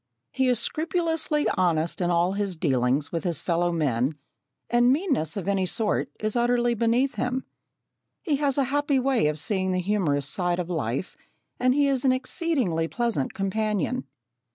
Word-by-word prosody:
He 265 Hz, -, +1 dB
is 250 Hz, -1 st, +3 dB
scrupulously 320 Hz, +2 st, 0 dB
honest 170 Hz, -2 st, 0 dB
in 175 Hz, -, +1 dB
all 175 Hz, +2 st, +2 dB
his 200 Hz, -2 st, -2 dB
dealings 135 Hz, -2 st, +1 dB
with 165 Hz, -, -2 dB
his 170 Hz, -5 st, -2 dB
fellow 175 Hz, 0 st, +1 dB
men, 140 Hz, -4 st, 0 dB, 0.5 s
and 240 Hz, +1 st, +4 dB
meanness 270 Hz, -, 0 dB
of 195 Hz, -, -4 dB
any 195 Hz, -2 st, +1 dB
sort 215 Hz, +2 st, -1 dB
is 215 Hz, +1 st, -2 dB
utterly 240 Hz, 0 st, +2 dB
beneath 235 Hz, +4 st, +1 dB
him. 250 Hz, +1 st, -1 dB, 0.8 s
He 305 Hz, -7 st, +1 dB
has 280 Hz, -1 st, 0 dB
a 280 Hz, -, +3 dB
happy 290 Hz, -1 st, +2 dB
way 260 Hz, -, +2 dB
of 150 Hz, 0 st, -1 dB
seeing 185 Hz, +4 st, 0 dB
the 185 Hz, -, 0 dB
humorous 175 Hz, -8 st, 0 dB
side 175 Hz, +3 st, -1 dB
of 180 Hz, 0 st, -3 dB
life, 140 Hz, -, -2 dB, 0.4 s
and 255 Hz, +1 st, +3 dB
he 285 Hz, -1 st, +3 dB
is 270 Hz, -2 st, 0 dB
an 265 Hz, -, +4 dB
exceedingly 255 Hz, -, 0 dB
pleasant 230 Hz, -, -2 dB
companion. 215 Hz, +5 st, -1 dB
205 Hz, 165 wpm, -25 LUFS, 170-255 Hz, 0.8 s, and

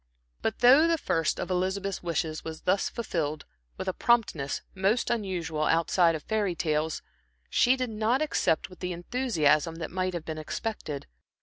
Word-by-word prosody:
But 220 Hz, -, -2 dB
though 270 Hz, +7 st, +7 dB
the 335 Hz, 0 st, +2 dB
first 165 Hz, -, 0 dB
of -, -, -3 dB
Elizabeth's 190 Hz, +2 st, -1 dB
wishes 160 Hz, -2 st, -2 dB
was 160 Hz, -1 st, -7 dB
thus 195 Hz, +2 st, +1 dB
fulfilled 155 Hz, -9 st, -3 dB, 0.3 s
with -, -, -5 dB
a 185 Hz, -, 0 dB
promptness 195 Hz, -14 st, +1 dB
most 195 Hz, +6 st, +1 dB
unusual 175 Hz, -8 st, -1 dB
outside 165 Hz, +1 st, +3 dB
of 155 Hz, -, -6 dB
fairy 210 Hz, -5 st, 0 dB
tales, 155 Hz, -1 st, -1 dB, 0.5 s
she 250 Hz, +2 st, +4 dB
did 255 Hz, -3 st, -3 dB
not 220 Hz, +4 st, +1 dB
accept 290 Hz, -, +1 dB
with 185 Hz, -, -15 dB
the 180 Hz, 0 st, -3 dB
enthusiasm 170 Hz, -, +1 dB
that 165 Hz, -1 st, -6 dB
might 185 Hz, 0 st, -1 dB
have 170 Hz, -, -5 dB
been 155 Hz, -1 st, -4 dB
expected. 155 Hz, -3 st, -4 dB
180 Hz, 165 wpm, -28 LUFS, 160-220 Hz, 0.5 s, though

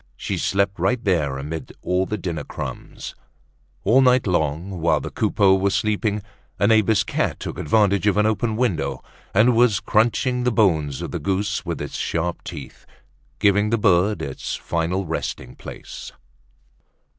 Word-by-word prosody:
She -, -, -3 dB
slept 100 Hz, 0 st, 0 dB
right 125 Hz, -1 st, +1 dB
there 75 Hz, -9 st, +1 dB
amid 75 Hz, +4 st, -6 dB
all 90 Hz, +1 st, +1 dB
the 105 Hz, -, -2 dB
dinner 85 Hz, -7 st, -4 dB
crumbs. -, -, -7 dB, 0.7 s
All 120 Hz, +7 st, +5 dB
night 125 Hz, -1 st, +4 dB
long, 85 Hz, +1 st, -1 dB
while 85 Hz, -, +3 dB
the -, -, -6 dB
Coupeaus 95 Hz, -2 st, +3 dB
were 100 Hz, -, +3 dB
sleeping, 105 Hz, +1 st, 0 dB, 0.3 s
a -, -, +2 dB
neighbor's 110 Hz, -1 st, +4 dB
cat -, -, -1 dB
took -, -, -6 dB
advantage 100 Hz, +4 st, +2 dB
of 105 Hz, -, +3 dB
an 105 Hz, -, +4 dB
open 110 Hz, +1 st, 0 dB
window 110 Hz, -10 st, -1 dB, 0.3 s
and 115 Hz, +4 st, +4 dB
was 115 Hz, -3 st, +4 dB
crunching 120 Hz, +3 st, +1 dB
the 125 Hz, -, +2 dB
bones 80 Hz, -, +1 dB
of -, -, -5 dB
the -, -, -3 dB
goose 100 Hz, 0 st, -1 dB
with 85 Hz, -3 st, -3 dB
its 75 Hz, -1 st, -5 dB
sharp 85 Hz, +1 st, -2 dB
teeth, 75 Hz, -6 st, -9 dB, 0.5 s
giving 105 Hz, +1 st, +3 dB
the 115 Hz, -, +2 dB
bird 95 Hz, -3 st, +2 dB
its 70 Hz, -3 st, -4 dB
final 85 Hz, +3 st, -2 dB
resting 80 Hz, 0 st, -4 dB
place. -, -, -9 dB
100 Hz, 155 wpm, -22 LUFS, 85-110 Hz, 0.7 s, All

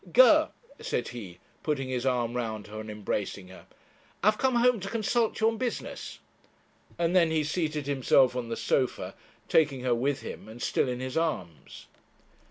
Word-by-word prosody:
'Ger,' -, -, +7 dB, 0.3 s
said 120 Hz, -, -2 dB
he, 100 Hz, -8 st, -8 dB, 0.2 s
putting 140 Hz, -4 st, -1 dB
his 130 Hz, 0 st, -2 dB
arm 120 Hz, -2 st, +1 dB
round 110 Hz, -4 st, -3 dB
her 110 Hz, +1 st, -8 dB
and 110 Hz, 0 st, -7 dB
embracing 100 Hz, -2 st, -3 dB
her 95 Hz, -, -14 dB, 0.6 s
'I -, -, +3 dB
have 215 Hz, -, -10 dB
come 260 Hz, -1 st, +2 dB
home 240 Hz, -1 st, +4 dB
to 195 Hz, +1 st, -5 dB
consult 230 Hz, +1 st, 0 dB
you 220 Hz, -, +4 dB
on 225 Hz, 0 st, +1 dB
business;' 250 Hz, -2 st, -4 dB, 0.8 s
and 170 Hz, +1 st, +1 dB
then 170 Hz, -3 st, +5 dB
he 160 Hz, -1 st, +1 dB
seated 155 Hz, -1 st, -2 dB
himself 135 Hz, -2 st, +3 dB
on 120 Hz, -2 st, -3 dB
the 115 Hz, -, -3 dB
sofa, 130 Hz, -2 st, 0 dB, 0.3 s
taking 145 Hz, -5 st, +3 dB
her 125 Hz, -1 st, +1 dB
with 135 Hz, +4 st, 0 dB
him, -, -, -8 dB
and 115 Hz, +2 st, -10 dB
still 125 Hz, -, +1 dB
in 125 Hz, 0 st, -3 dB
his 130 Hz, +3 st, -3 dB
arms. 95 Hz, -, -3 dB
135 Hz, 180 wpm, -28 LUFS, 120-170 Hz, 0.8 s, Ger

